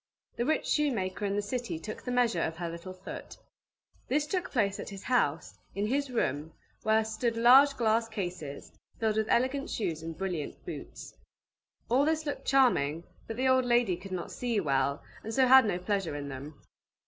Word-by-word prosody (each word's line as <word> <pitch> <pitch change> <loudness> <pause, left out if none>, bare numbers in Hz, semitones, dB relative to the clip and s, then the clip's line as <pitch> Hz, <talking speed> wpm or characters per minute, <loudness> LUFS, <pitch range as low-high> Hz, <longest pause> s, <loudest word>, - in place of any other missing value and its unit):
The 240 - -1
rich 315 - +1
shoemaker 210 -10 0
in 200 0 0
the 205 - 0
city 235 -5 -3
took 215 +7 -7
the - - -6
measure 240 -8 +2
of 160 0 -2
her 170 -1 -3
little 170 +3 -7
foot. 185 +1 -9 0.7
This 290 +3 +1
took 360 +4 -2
place 205 -6 0
at - - -6
his 195 -1 -9
house, 150 - 0 0.2
in 200 +1 0
his 275 +5 0
room; 155 - -1 0.3
where 220 0 +3
stood 230 +1 -1
large 270 +4 +7
glass 225 0 +2
cases, 175 -9 -5 0.3
filled 220 -1 +1
with 220 0 0
elegant 260 +3 +1
shoes 165 -8 -2
and 165 0 -6
brilliant 180 -6 -4
boots. - - -8 0.7
All 255 +4 +3
this 315 +1 +1
looked 290 - -4
charming, 170 - +3 0.2
but 225 - -5
the 260 +1 +1
old 260 -1 +4
lady 240 -6 +3
could 185 +2 -11
not 180 -2 -4
see 240 -4 -1
well, 140 -4 0 0.2
and 220 - -5
so 265 - +5
had 265 0 +8
no 190 - 0
pleasure 185 -3 -2
in 145 -1 -5
them. 140 +3 -8
215 Hz, 185 wpm, -30 LUFS, 170-250 Hz, 0.7 s, had